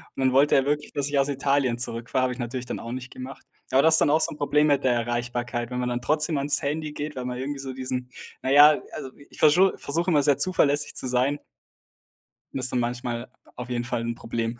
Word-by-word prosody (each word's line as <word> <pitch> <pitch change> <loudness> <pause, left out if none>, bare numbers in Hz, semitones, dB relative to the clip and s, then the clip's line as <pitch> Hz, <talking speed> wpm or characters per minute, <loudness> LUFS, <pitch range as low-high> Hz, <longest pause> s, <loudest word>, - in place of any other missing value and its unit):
Und - - -4
dann 130 - +3
wollte 140 +2 +4
er 135 0 +3
wirklich, 150 +2 -2
dass 145 -1 -1
ich 140 -1 +1
aus 135 +1 +1
Italien 135 -3 0
zurückfahre. 120 +2 -2
Habe 125 -1 0
ich 125 - -12
natürlich 120 +1 -4
dann - - -5
auch 115 - -7
nicht 125 0 -7
gemacht. 130 +1 -9 0.2
Aber 135 +1 +3
das 160 0 +6
ist - - +8
dann - - +4
auch 155 +2 +4
so - - +2
'n - - -12
Problem 150 +1 +2
mit 145 -2 +2
der 125 -2 +3
Erreichbarkeit, 120 0 -3
wenn 125 0 -4
man 125 0 -1
dann 120 0 -2
trotzdem 150 +3 +1
ans 140 +1 +2
Handy 150 +1 -2
geht, 150 0 -5
weil 125 -1 -5
man 125 0 -4
irgendwie 140 +2 -4
so 135 -1 -6
diesen 125 -1 -4 0.3
na 130 - -3
ja, 145 +1 +7
also, 130 - -7 0.2
ich - - -16
verschu 175 +5 +5
versuche 170 +5 -2
immer 145 -4 +3
sehr 145 -1 +3
zuverlässig 145 -5 +2
zu - - 0
sein 130 +3 +1 1.2
und - - -3
das 130 - -1
ist - - -1
dann 125 - 0
manchmal 120 0 -3 0.3
auf 125 0 -7
jeden 120 -1 -2
Fall 120 -1 -3
'n 115 0 -3
Problem. 115 0 -4
130 Hz, 250 wpm, -25 LUFS, 125-145 Hz, 1.2 s, ist